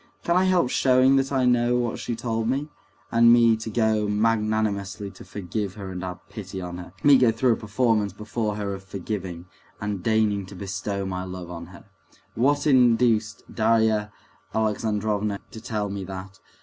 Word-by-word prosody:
Can 170 - +1
I 185 +1 +4
help 180 -8 +2
showing 130 +1 +4
that 135 0 0
I 130 -2 +2
know 120 0 +3
what 120 -2 -2
she 120 - -3
told 115 -1 -2
me? 140 +4 -1 0.4
And 115 0 +6
me 115 -1 +6
to 110 0 -6
go 110 -1 +1
magnanimously 105 -2 0
to - - -13
forgive 100 0 -4
her, 100 -3 -7
and 90 -1 -5
have 90 +1 -7
pity 100 -2 -7
on 90 -1 -6
her! 90 0 -9
Me 140 -2 +7
go 125 -3 +5
through 115 +2 +2
a - - 0
performance 110 -2 0
before 105 +1 -3
her 100 -1 -3
of 95 0 -8
forgiving, 95 -3 -5 0.3
and 100 -2 -3
deigning 105 -2 +1
to 100 - -11
bestow 95 +1 -4
my 95 -1 -3
love 90 -1 -7
on 85 -1 -7
her!... 90 -1 -14 0.5
What 145 +5 +2
induced 120 -5 +3
Darya 110 -1 +2 0.4
Alexandrovna 105 -1 0
to 110 - -9
tell 105 -3 -2
me 100 -1 -4
that? 95 +1 -8
105 Hz, 175 wpm, -25 LUFS, 100-115 Hz, 0.5 s, Me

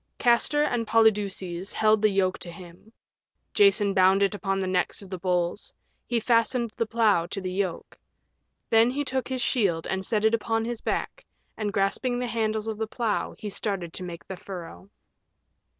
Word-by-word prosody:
Castor 250 +4 +3
and 240 -6 -1
Polydeuces 200 -5 +1
held 215 -1 +3
the 215 - +4
yoke 190 -2 0
to 175 - -5
him. 175 +4 -13 0.6
Jason 230 - +4
bound 190 +1 +4
it 200 - +2
upon 195 -1 -2
the 190 - -1
necks 185 +2 -1
of 195 - -13
the 185 - -4
bulls. 180 +1 -1 0.4
He 240 -1 +1
fastened 230 0 +1
the 230 - -1
plow 215 -7 +2
to 195 - -4
the 185 -1 -4
yoke. 190 -3 -3 0.7
Then 225 +1 +5
he 285 +3 -2
took 260 -1 -2
his 260 -2 -2
shield 185 -9 +1
and 190 0 -2
set 215 +2 0
it 220 - +4
upon 225 0 0
his 235 -1 -4
back, - - -3 0.3
and 210 -2 -2
grasping 200 +6 0
the 250 - -2
handles 220 -2 -1
of 220 -1 -4
the 220 - -1
plow 220 -1 -2
he 210 -2 -6
started 190 -5 -3
to 185 - -4
make 170 -2 -8
the 190 - -7
furrow. 185 +1 -9
210 Hz, 180 wpm, -26 LUFS, 190-230 Hz, 0.7 s, Then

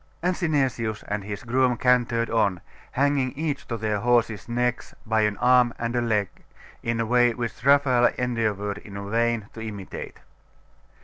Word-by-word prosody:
And 180 +1 +1
Synesius 135 - -1
and 105 -1 -3
his 105 0 -6
groom 125 +1 +2
cantered 120 -2 +2
on, 100 -6 +1 0.3
hanging 140 -1 +1
each 145 -2 -3
to 115 - -3
their 105 -2 -1
horses' 120 -1 +1
necks 125 +1 -1
by 110 -1 +2
an 105 -1 +1
arm 125 -1 +4
and 115 +1 -3
a 120 - +2
leg, 105 -4 +1 0.5
in 115 0 -2
a 115 - +1
way 120 +1 +4
which 120 -1 -5
Raphael 135 -3 +5
endeavoured 105 -5 -1
in 100 -1 -8
vain 115 -2 +1
to 115 - -8
imitate. 105 -4 -7
115 Hz, 160 wpm, -25 LUFS, 110-125 Hz, 0.5 s, Raphael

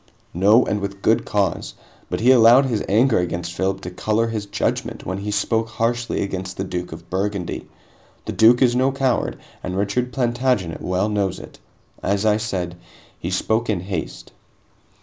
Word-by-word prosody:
"No, 105 +7 +5
and 105 - -1
with 100 0 -5
good 110 - +3
cause. 100 -5 -1 0.3
But - - -2
he 125 +3 +6
allowed 120 +2 +7
his 115 -5 -1
anger 115 +4 +4
against 85 -1 -3
Philip 95 +2 -1
to 90 - -6
color 110 +5 0
his 110 -3 -4
judgment - - -2
when 95 +2 -3
he 105 +1 -4
spoke 115 +2 0
harshly 120 +1 -1
against 95 -1 -5
the 95 - -2
Duke 90 -2 -4
of 85 +1 -11
Burgundy. 95 -1 -3 0.6
The - - -3
Duke 120 +3 +5
is 120 -1 +3
no 130 +2 +3
coward, 135 -2 0 0.2
and 90 0 -4
Richard 110 +6 0
Plantagenet 120 -8 0
well 90 +2 0
knows 100 -3 -1
it. - - -12 0.4
As 100 +2 0
I 105 -1 +4
said, 90 -6 -3 0.4
he 85 - -4
spoke 110 +5 0
in 100 -5 0
haste." 90 -3 -5
105 Hz, 170 wpm, -21 LUFS, 95-115 Hz, 0.6 s, allowed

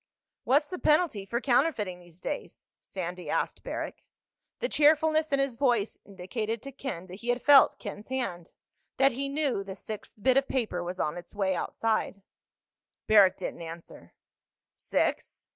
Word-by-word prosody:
"What's 290 +5 +3
the 365 - -4
penalty 300 - +2
for 235 +4 -1
counterfeiting 240 - +1
these 175 -1 -17
days?" 290 - -6
Sandy 180 -1 -6
asked - - -1
Barrack. - - -5 0.6
The - - -1
cheerfulness 310 -2 +3
in 280 - +3
his 275 -2 0
voice 235 -4 +1
indicated 215 +4 -4
to 275 - -7
Ken 255 -10 -6
that 185 +1 -10
he 240 - -4
had 245 0 +2
felt 285 -1 +6
Ken's 205 -1 -8
hand—that 260 +3 -2
he 275 +3 -3
knew 280 -8 0
the 195 -1 -7
sixth 215 +1 -8
bit 260 +5 +3
of 275 0 +2
paper 215 -9 -1
was 180 +1 -5
on 150 +3 -1
its 175 - -14
way 195 -2 +1
outside. 215 -1 -1 0.8
Barrack 200 -3 +6
didn't - - -5
answer. 165 - -10 0.6
"Six?" - - -2
225 Hz, 155 wpm, -28 LUFS, 185-275 Hz, 0.8 s, felt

